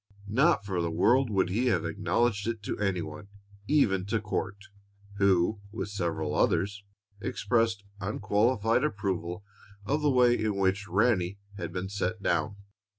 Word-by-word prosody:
Not 130 -2 +3
for 95 -3 -1
the 85 - -1
world 125 +10 +3
would 95 -3 +1
he 120 +6 +1
have 120 - +1
acknowledged 115 -3 0
it 115 -3 -3
to - - -4
any 95 -4 0
one 105 - -9 0.4
even 110 -10 +3
to 115 +2 0
Court, 100 -2 -3 0.6
who, 100 +1 +3
with 110 -1 -4
several 85 -6 -2
others, 100 +1 +1 0.4
expressed 110 0 0 0.2
unqualified 110 +4 +1
approval 95 - -2 0.4
of 145 +8 0
the 150 - +3
way 125 -2 +5
in 105 -2 0
which 100 +1 0
Ranny 100 -2 +1 0.2
had 85 -4 -5
been 90 +2 -3
"set 100 +1 -2
down." 85 +3 0
100 Hz, 150 wpm, -29 LUFS, 95-115 Hz, 0.6 s, way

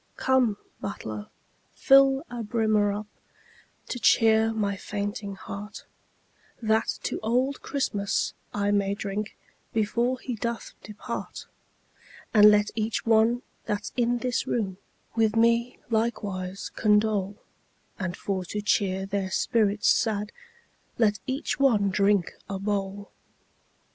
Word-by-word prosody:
Come, 255 -6 +2 0.2
butler, 110 - -5 0.5
fill 270 +1 +5
a 240 -1 -6
brimmer 215 -2 +2
up 205 +1 -4 0.8
To 245 - -3
cheer 225 -1 +4
my 205 -3 -1
fainting 205 0 -4
heart, 200 +2 -8 0.7
That 220 -1 +1
to - - -2
old 250 +5 0
Christmas 205 -8 -1 0.2
I 205 0 0
may 200 -1 +1
drink 205 +1 -4 0.4
Before 235 +4 0
he 250 - -4
doth 235 +1 -4
depart; 215 +3 -7 0.9
And 210 -2 +9
let 210 0 +3
each 220 0 -2
one 230 +2 +3 0.2
that's 210 0 -3
in 240 -1 +2
this 245 0 -1
room 195 -6 -1 0.4
With 225 -1 +2
me 235 +2 +3
likewise 200 -4 -2
condole, 210 -2 +2 0.6
And 185 -2 -3
for 190 -2 -2
to 210 - -4
cheer 195 -3 +1
their 195 -1 -2
spirits 205 0 +2
sad 210 -2 +1 0.7
Let 215 -2 +2
each 270 +2 -2
one 215 -8 +3
drink 200 -2 +2 0.2
a 195 - -2
bowl. 200 0 -3
210 Hz, 120 wpm, -26 LUFS, 200-230 Hz, 0.9 s, And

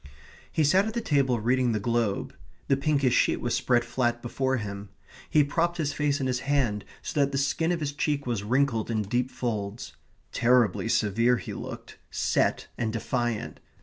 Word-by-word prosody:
He 160 - +1
sat 185 +8 +4
at 220 - -5
the - - +1
table 140 - +1
reading 125 +1 +2
the 110 - 0
Globe. 115 -2 -1 0.4
The 135 - +5
pinkish 140 -3 +1
sheet - - +3
was - - -2
spread 120 -1 +2
flat 120 0 0
before 130 +2 0
him. 100 -2 -6 0.4
He 150 - +5
propped 170 +4 0
his 145 -3 -1
face 145 -1 0
in 135 - -1
his 125 -1 0
hand, 130 -6 0 0.2
so - - -3
that 140 -1 +3
the 135 - -1
skin 160 +5 +1
of 170 -2 -1
his 145 -1 -1
cheek 145 0 -1
was 120 -5 -1
wrinkled 120 +1 +1
in 110 -2 0
deep 120 +5 -1
folds. 110 -4 -4 0.4
Terribly 120 -3 +2
severe 115 +3 +2
he 90 - -7
looked, - - -8
set, - - +1
and 115 -2 0
defiant. 120 0 -2
125 Hz, 180 wpm, -27 LUFS, 115-140 Hz, 0.4 s, The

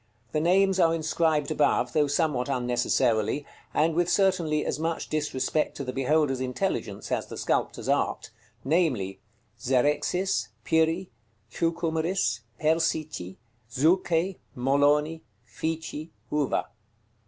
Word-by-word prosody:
The 155 - 0
names 190 +3 +3
are 165 -2 +4
inscribed 160 -2 +1
above, 150 - +2
though 150 -2 +3
somewhat 145 -3 0
unnecessarily, 125 0 +1 0.3
and 160 +2 +2
with 175 +1 +1
certainly 175 -6 +2
as - - -2
much 165 +1 -2
disrespect 150 0 -1
to - - -4
the 130 -1 -4
beholder's 135 0 +1
intelligence 125 -1 -3
as - - -1
the - - -8
sculptor's - - -1
art, - - 0 0.3
namely, 135 - +1 0.4
ZEREXIS, 135 - +1 0.2
PIRI, 160 +4 +1 0.4
CHUCUMERIS, 165 -6 0 0.2
PERSICI, 155 - 0 0.3
ZUCHE, 170 +6 +1 0.2
MOLONI, 145 +5 +2 0.2
FICI, 160 +5 -4 0.2
HUVA. 150 -3 0
155 Hz, 110 wpm, -27 LUFS, 135-165 Hz, 0.4 s, are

